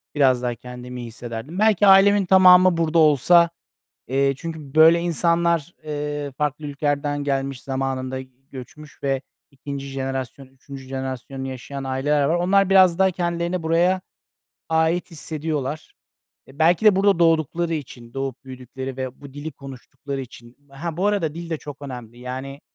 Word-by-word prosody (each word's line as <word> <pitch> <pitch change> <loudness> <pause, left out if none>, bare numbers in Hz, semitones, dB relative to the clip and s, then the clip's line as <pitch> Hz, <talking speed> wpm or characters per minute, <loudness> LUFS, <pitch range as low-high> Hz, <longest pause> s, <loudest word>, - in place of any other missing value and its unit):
biraz 130 -4 +3
daha 120 -1 -2
kendimi 125 +1 -9
iyi 120 - -7
hissederdim? 120 - -7
Belki 210 -2 +4
ailemin 195 +1 +6
tamamı 185 -1 +6
burada 165 0 +2
olsa, 160 +3 +5 0.6
eee, 135 +1 +1
çünkü 155 -2 -8
böyle 165 +2 +7
insanlar, 170 -1 +1
eee, 145 -1 -4
farklı 150 0 -2
ülkelerden 145 0 -2
gelmiş, 135 -2 -2
zamanında 130 -1 -3 0.3
göçmüş 150 +4 -12
ve 135 -1 -1 0.3
2'nci 140 0 -7
jenerasyon, 135 0 -5
3'üncü 135 0 -12
jenerasyonunu 130 0 -5
yaşayan 135 +1 -7
aileler 140 +2 0
var. 160 - +2
Onlar 195 +2 +2
biraz 185 -3 +6
daha 190 0 +4
kendilerini 175 0 -2
buraya 175 +3 +2 0.7
ait 160 +3 +1
hissediyorlar. 155 -2 -4 0.5
E, 135 +4 -17
belki 170 +6 +3
de 210 -3 +7
burada 195 -2 +3
doğdukları 165 0 +2
için, 120 -6 -7
doğup 135 -1 -4
büyüdükleri 130 0 -8
ve 130 +1 -6
bu 140 -1 -11
dili 150 +2 -6
konuştukları 135 0 -8
için, 120 0 -13
ha, 155 +4 -6
bu 185 - 0
arada, 175 -8 0
dil 170 0 -7
de 160 - -2
çok 145 -1 -10
önemli, 120 -4 -9
yani, 130 +3 -7
145 Hz, 150 wpm, -22 LUFS, 135-170 Hz, 0.7 s, böyle